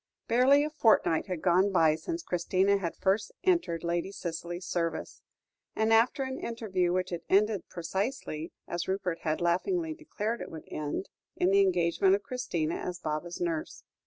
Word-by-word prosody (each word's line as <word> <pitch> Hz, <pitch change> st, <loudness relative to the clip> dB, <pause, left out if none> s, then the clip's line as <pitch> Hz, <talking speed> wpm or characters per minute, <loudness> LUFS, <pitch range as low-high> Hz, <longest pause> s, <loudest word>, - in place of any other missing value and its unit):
Barely 265 Hz, +4 st, +5 dB
a 305 Hz, -, -4 dB
fortnight 220 Hz, -, +3 dB
had 180 Hz, -4 st, -4 dB
gone 185 Hz, +2 st, +4 dB
by 165 Hz, -4 st, +4 dB
since 330 Hz, -, -4 dB
Christina 185 Hz, -, +2 dB
had 170 Hz, -3 st, -3 dB
first 200 Hz, -, 0 dB
entered 335 Hz, -, +1 dB
Lady 170 Hz, +2 st, -1 dB
Cicely's 175 Hz, -1 st, -5 dB
service, 165 Hz, -2 st, -3 dB, 0.5 s
after 225 Hz, +4 st, +3 dB
an 260 Hz, 0 st, -4 dB
interview 195 Hz, -7 st, -1 dB
which 185 Hz, 0 st, -1 dB
had 175 Hz, -, -3 dB
ended 205 Hz, 0 st, +2 dB
precisely 175 Hz, -, -3 dB, 0.2 s
as 175 Hz, 0 st, -3 dB
Rupert 190 Hz, -3 st, -1 dB
had 155 Hz, 0 st, -1 dB
laughingly 320 Hz, -, +1 dB
declared 235 Hz, -8 st, -4 dB
it -, -, -6 dB
would 160 Hz, -, -9 dB
end, 150 Hz, +5 st, -3 dB, 0.3 s
in 180 Hz, -, +2 dB
the 200 Hz, 0 st, +6 dB
engagement 185 Hz, 0 st, +3 dB
of 200 Hz, -, -5 dB
Christina 170 Hz, -, -2 dB
as 180 Hz, -1 st, -4 dB
Baba's 165 Hz, +1 st, -4 dB
nurse. 165 Hz, -3 st, -3 dB
185 Hz, 160 wpm, -29 LUFS, 170-225 Hz, 0.5 s, the